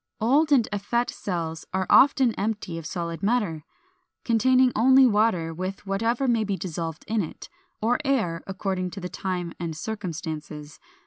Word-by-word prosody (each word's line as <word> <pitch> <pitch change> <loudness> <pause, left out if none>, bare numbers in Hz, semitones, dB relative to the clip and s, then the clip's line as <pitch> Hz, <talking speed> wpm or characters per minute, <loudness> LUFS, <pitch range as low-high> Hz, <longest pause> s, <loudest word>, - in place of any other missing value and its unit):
Old 285 +8 +3
and 250 -6 +4
effete 235 +4 -1
cells 165 -4 -4
are 190 0 0
often 265 -3 +5
empty 200 -5 -3
of 160 - -7
solid 170 -2 -4
matter, 200 -8 0 0.6
containing 255 +2 +4
only 260 +4 +6
water 210 -8 +2
with 185 +4 -5
whatever 225 +7 0
may 230 -3 +2
be 200 -2 -2
dissolved 165 -3 -5
in 220 0 +1
it, 165 - -8 0.3
or 240 +5 +2
air, 220 - 0
according 190 -1 -2
to 195 - -8
the 180 -1 -5
time 180 -3 -4
and 165 -3 -4
circumstances. 160 -6 -6
195 Hz, 150 wpm, -25 LUFS, 170-235 Hz, 0.6 s, only